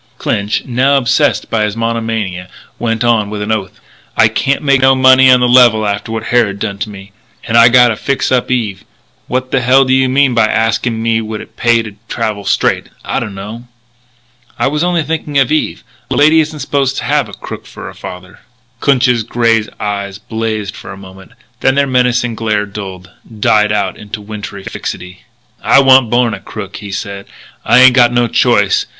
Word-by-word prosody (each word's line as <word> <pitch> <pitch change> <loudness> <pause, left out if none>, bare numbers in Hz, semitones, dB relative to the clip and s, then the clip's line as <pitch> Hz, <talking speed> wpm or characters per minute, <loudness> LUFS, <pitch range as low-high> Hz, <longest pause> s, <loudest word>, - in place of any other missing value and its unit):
Clinch, 100 +1 -2
now 130 +3 +2
obsessed 135 +3 0
by 115 -2 +1
his 105 +1 -3
monomania, 115 -6 -3 0.3
went 115 -1 -1
on 115 -4 +1
with 105 0 -5
an 105 - -3
oath: 105 -4 -3 0.4
"I 110 - +5
can't 140 +6 -1
make 140 -2 +3
no 135 0 +5
money 130 0 +5
on 125 -1 +5
the 125 - +3
level 120 -3 +5
after 100 +2 -3
what 115 0 -4
Harrod 115 -5 +1
done 100 0 -4
to 110 - -3
me. 100 -1 -12 0.4
And 115 - -1
I 115 0 +7
gotta 120 -2 +4
fix 135 +5 -2
up 125 -2 +1
Eve. 110 -6 -2 0.4
What 130 +1 -3
the 135 - +1
hell 130 +2 +4
do 130 - +1
you 130 0 +2
mean 135 0 +2
by 115 -2 +3
asking 115 +1 -1
me 115 0 +1
would 110 -1 -6
it - - -13
pay 120 -1 +2
me 115 - +1
to 105 -2 -10
travel 110 -3 -3
straight - - 0 0.2
I - - -1
dunno." 105 +4 -8 0.9
"I - - 0
was 150 +3 0
only 175 -2 0
thinking 155 -2 -3
of 135 +1 +2
Eve. 155 - -1 0.3
A - - -2
lady 155 +2 +4
isn't 155 -1 -2
supposed 135 -1 -1
to - - -3
have - - 0
a - - -13
crook - - -9
for - - -10
a - - -9
father." 90 +1 -10 0.4
Clinch's 125 -4 +2
grey 115 0 +1 0.2
eyes 100 -2 -4
blazed 110 -2 -4
for - - -10
a 95 - -9
moment, 95 0 -14 0.3
then 130 - +2
their 140 0 +2
menacing 125 -2 +1
glare 110 -2 -1
dulled, 95 -3 -9 0.3
died 105 0 +2
out 100 -3 -1
into 105 +1 -8
wintry 105 -2 -8
fixity. 90 -1 -7 0.4
"I - - +3
wan't 130 -3 +5
born 120 -1 +1
a - - -6
crook," 100 -2 -8
he 100 -1 -9
said. 100 0 -6 0.4
"I - - +3
ain't 130 0 +7
got 120 -2 +4
no 120 0 +2
choice. 115 -4 +2
115 Hz, 195 wpm, -13 LUFS, 105-130 Hz, 0.9 s, I